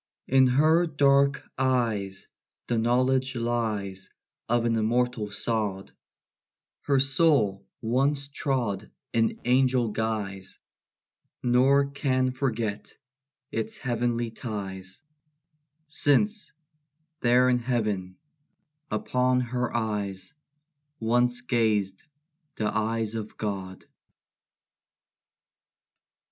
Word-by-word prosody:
In 130 0 +5
her 155 +7 +4
dark 140 -2 +3
eyes 115 -7 0 0.4
the 120 -2 0
knowledge 130 +3 +2
lies 110 -5 -2 0.4
Of 120 0 +2
an 115 -1 +2
immortal 115 0 0
sod, 105 -2 -2 0.9
Her 140 -2 +3
soul 135 -8 +2
once 135 +5 +1
trod 125 -8 -2 0.2
in 115 -1 +1
angel 125 -1 +3
guise, 105 -3 -3 0.9
Nor 130 +3 +4
can 130 -2 0
forget 115 -5 -3 0.5
its 110 0 -2
heavenly 120 -2 -1
ties, 95 0 -6 0.8
Since, 205 +9 +1 0.7
there 125 0 +4
in 125 -1 +3
Heaven, 105 -7 -2 0.7
upon 125 +3 +1
her 125 0 -2
eyes 105 -1 -3 0.7
Once 120 +2 +1
gazed 110 -6 0 0.5
the 105 -1 -2
eyes 110 0 -1
of 110 -1 -6
God. 95 -3 -5
120 Hz, 85 wpm, -27 LUFS, 105-130 Hz, 0.9 s, In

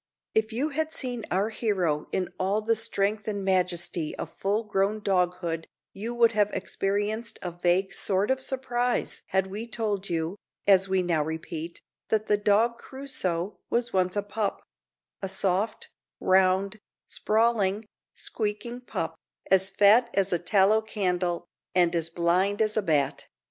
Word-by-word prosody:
If 220 +1 +1
you 260 +7 -1
had 315 +2 -2
seen 245 -7 -3
our 195 +4 +1
hero 185 -10 -1
in 185 -1 -2
all 195 +3 +1
the 230 +1 +2
strength 215 -1 0
and 205 -2 -2
majesty 175 -4 0
of - - -6
full 205 +3 0
grown 205 0 0
doghood, 180 -4 0 0.3
you 225 +5 -5
would 235 -1 +5
have 210 -2 +2
experienced 205 +4 -1
a 180 - -3
vague 175 +2 +1
sort 195 +4 +1
of 265 0 0
surprise 250 -2 -1
had 190 0 +1
we 205 +5 -6
told 210 -4 -2
you 165 +3 -2 0.3
as 195 -1 +5
we 190 -1 +2
now 165 -4 +1
repeat 160 +1 -6 0.3
that 215 -1 +1
the 210 - +3
dog 215 +3 +2
Crusoe 205 -11 -2
was 240 0 0
once 185 0 +1
a 205 - 0
pup 205 0 -3 0.6
a 195 - -3
soft, 195 +3 0 0.3
round, 190 +2 +3 0.3
sprawling, 215 -2 +1 0.3
squeaking 220 +3 -2
pup, 165 -9 -3 0.4
as 190 0 +5
fat 210 +5 +5
as 195 -1 +1
a 175 - +2
tallow 200 +4 +3
candle, 180 -5 -1 0.3
and 175 -2 +4
as 165 -1 0
blind 175 +4 +1
as 215 -1 +1
a 215 - +2
bat. 150 -7 0
200 Hz, 150 wpm, -27 LUFS, 180-220 Hz, 0.6 s, would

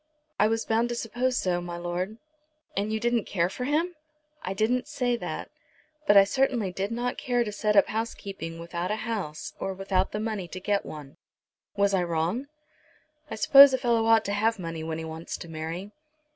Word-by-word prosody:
"I 210 - +5
was 225 0 0
bound 230 +2 +1
to 240 - -2
suppose 245 +2 -1
so, 175 -1 0
my 175 -1 -6
lord." 175 +5 -3 0.6
"And 205 +2 -1
you 220 - 0
didn't 240 -1 +1
care 175 -2 0
for 250 +6 -5
him!" 320 +6 +1 0.5
"I 190 - -4
didn't 245 +6 +1
say 250 -5 0
that. - - -5 0.6
But 205 - +7
I 200 - +10
certainly 235 -2 +1
did 190 +2 -2
not 245 +2 -2
care 245 -3 +1
to 210 - -4
set 210 0 0
up 200 - +7
housekeeping 200 -6 -5
without 170 +1 -4
a 210 - +1
house 190 -10 -4
or 195 - -3
without 190 0 0
the 210 - -3
money 215 -4 -3
to 185 - -7
get 200 +1 0
one. 145 -3 -9 0.6
Was 200 0 +3
I 190 - +3
wrong?" 175 - -1 0.8
"I - - -4
suppose 275 +5 +8
a - - -1
fellow 235 -2 +2
ought 225 -1 +5
to 200 - -1
have 225 +2 +1
money 165 -3 -5
when 160 0 -3
he 160 - -5
wants 160 +1 -6
to - - -9
marry. 165 +5 -5
205 Hz, 200 wpm, -27 LUFS, 175-230 Hz, 0.8 s, I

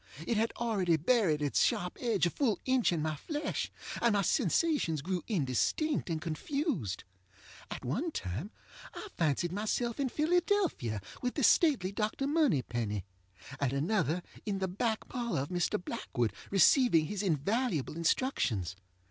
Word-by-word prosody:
It 230 - 0
had 225 +2 +1
already 195 -8 +1
buried 165 - +2
its 145 - +2
sharp 180 0 0
edge 225 -7 +2
a 175 - +1
full 245 -8 0
inch 260 -5 +3
in 165 -3 -1
my 155 -1 -1
flesh, 295 - -3 0.3
and 235 -2 +4
my 200 -1 +2
sensations 185 - +1
grew 180 +1 -1
indistinct 195 - 0
and 160 -2 -1
confused. 165 - -2 0.7
At - - -6
one 215 - -1
time 105 - -4 0.5
I 425 - -7
fancied 165 +1 +1
myself 220 +5 -1
in 275 -2 +1
Philadelphia 335 - +1 0.2
with 250 0 -2
the 285 - 0
stately 250 - +4
Dr. 215 +6 -1
Moneypenny, 125 - 0 0.5
at 135 -2 0
another 170 +3 0 0.2
in 205 -2 -2
the 190 0 -1
back 220 +4 -2
parlor 235 - -2
of 140 - -4
Mr. 175 -2 0
Blackwood 120 - -2 0.2
receiving 195 - +5
his 205 +3 -3
invaluable 185 - 0
instructions. 160 - 0
190 Hz, 145 wpm, -32 LUFS, 155-250 Hz, 0.7 s, receiving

